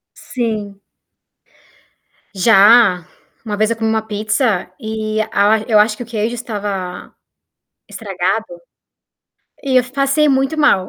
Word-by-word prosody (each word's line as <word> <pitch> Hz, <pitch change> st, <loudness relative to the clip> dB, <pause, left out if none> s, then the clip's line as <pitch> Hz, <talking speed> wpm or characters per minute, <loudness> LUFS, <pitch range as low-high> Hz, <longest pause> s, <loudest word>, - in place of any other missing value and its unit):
Sim. 215 Hz, -5 st, -5 dB, 1.5 s
Já, 200 Hz, -2 st, +5 dB, 0.4 s
uma 210 Hz, -2 st, -4 dB
vez 215 Hz, +2 st, +1 dB
eu 230 Hz, -, -1 dB
comi 225 Hz, 0 st, -1 dB
uma 220 Hz, 0 st, 0 dB
pizza, 215 Hz, -2 st, -1 dB
e 220 Hz, 0 st, -4 dB
a 210 Hz, +2 st, +3 dB
eu 215 Hz, -3 st, +3 dB
acho 210 Hz, 0 st, +3 dB
que -, -, -7 dB
o -, -, -9 dB
queijo 230 Hz, 0 st, -3 dB
estava 200 Hz, -6 st, -6 dB, 0.7 s
estragado 195 Hz, +1 st, -3 dB, 1.2 s
e 265 Hz, -2 st, 0 dB
eu 250 Hz, -, +1 dB
passei 275 Hz, +2 st, +2 dB
muito 270 Hz, +3 st, 0 dB
mal. 200 Hz, -11 st, +3 dB
220 Hz, 120 wpm, -17 LUFS, 205-240 Hz, 1.5 s, Já